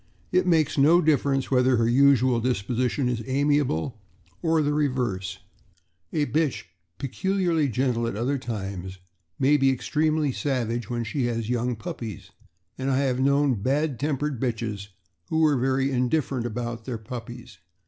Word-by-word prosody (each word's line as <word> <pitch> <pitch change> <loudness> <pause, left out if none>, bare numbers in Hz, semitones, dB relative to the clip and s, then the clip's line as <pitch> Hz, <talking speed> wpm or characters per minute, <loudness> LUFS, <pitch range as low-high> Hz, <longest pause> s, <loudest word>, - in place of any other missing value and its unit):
It 180 0 +2
makes 155 -4 +2
no 160 +5 +6
difference 140 -4 +1
whether 130 -1 +4
her 115 0 +2
usual 130 -1 +4
disposition 125 +3 0
is 120 -2 -1
amiable 135 - 0 0.4
or 160 -1 +2
the 145 0 +1
reverse, 120 -11 -1 0.7
a 150 -2 +1
bitch 155 -2 0 0.3
peculiarly 170 +1 0
gentle 120 -1 0
at 115 - -3
other 130 +6 -1
times 95 -6 -5 0.4
may 145 +3 +4
be 135 -1 +3
extremely 150 +3 +1
savage 120 -2 -2
when 120 -1 -2
she 125 +3 -2
has 115 -2 -2
young 125 0 0
puppies; 115 - -7 0.5
and 130 +1 -1
I 130 - +2
have 130 -2 0
known 140 -4 +2
bad 140 +2 0
tempered 145 -2 -2
bitches 110 -5 -3 0.4
who 160 - +1
were 155 -2 +4
very 135 +1 +1
indifferent 125 -1 0
about 120 0 -5
their 125 -3 -3
puppies. 120 -2 -9
130 Hz, 145 wpm, -25 LUFS, 115-145 Hz, 0.7 s, no